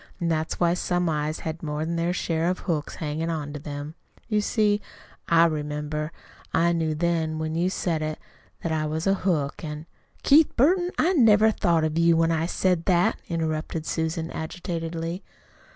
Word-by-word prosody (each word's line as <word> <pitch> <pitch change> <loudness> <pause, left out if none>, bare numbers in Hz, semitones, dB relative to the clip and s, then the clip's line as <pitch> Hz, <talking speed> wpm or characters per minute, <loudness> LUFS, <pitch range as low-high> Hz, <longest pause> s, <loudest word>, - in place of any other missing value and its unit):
And 170 -2 0
that's 160 0 -1
why 170 -1 +3
some 180 0 0
eyes 150 0 -2
had 160 +1 -5
more 150 0 -2
than 170 +1 -2
their 170 +1 0
share 170 -1 0
of 185 - 0
hooks 155 -5 -2
hanging 155 +2 -3
on 150 -3 -3
to 150 - -5
them. 145 +1 -6 0.3
You 215 -2 +1
see 210 -1 +2 0.5
I 170 0 +6
remembered. 150 -1 -2 0.5
I 170 +1 +4
knew 160 -2 0
then, 160 -1 0
when 155 0 -2
you 170 +3 +1
said 170 -4 -1
it, 155 0 -2 0.5
that 170 - -1
I 155 -1 0
was 160 +2 -2
a 195 - +4
hook, 165 -8 -1
and 150 0 -5 0.2
" - - -35
"Keith 305 +2 +5
Burton, 350 +8 +3
I 360 +4 +3
never 220 - +5
thought 170 -6 +2
of 155 +1 0
you 170 0 +5
when 165 0 +3
I 165 0 0
said 180 -2 +1
that," 175 -2 +2
interrupted 160 -1 -2
Susan 160 +1 -2
agitatedly. 165 +1 -4
165 Hz, 185 wpm, -25 LUFS, 155-175 Hz, 0.5 s, I